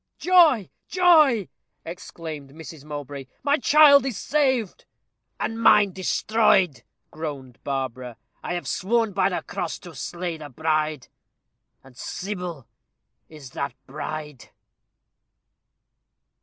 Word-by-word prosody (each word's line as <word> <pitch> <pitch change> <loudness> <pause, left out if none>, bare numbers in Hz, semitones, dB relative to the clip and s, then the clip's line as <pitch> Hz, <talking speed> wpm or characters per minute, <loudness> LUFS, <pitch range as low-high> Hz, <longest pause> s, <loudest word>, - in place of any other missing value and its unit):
"Joy! 335 - +4 0.2
joy!" 310 - +4 0.4
exclaimed 160 -4 -8
Mrs. 160 -2 -11
Mowbray: 145 -2 -7 0.2
"my 285 +1 +3
child 285 0 +7
is 265 -5 -3
saved." 260 -8 0 0.5
"And 225 0 -3
mine 210 -3 +5
destroyed," 190 - +2 0.3
groaned 140 -6 -7
Barbara. 130 -3 -4 0.2
"I 175 - -3
have 175 - -5
sworn 225 +1 0
by 195 0 +2
the 180 - -3
cross 170 - -4
to 175 - -12
slay 175 0 -5
the 150 -2 -9
bride 155 0 -1 0.8
and 135 -2 -18
Sybil 180 - -6 0.6
is 150 -5 -12
that 140 -3 -4
bride." 150 0 -7
170 Hz, 105 wpm, -24 LUFS, 145-225 Hz, 0.8 s, child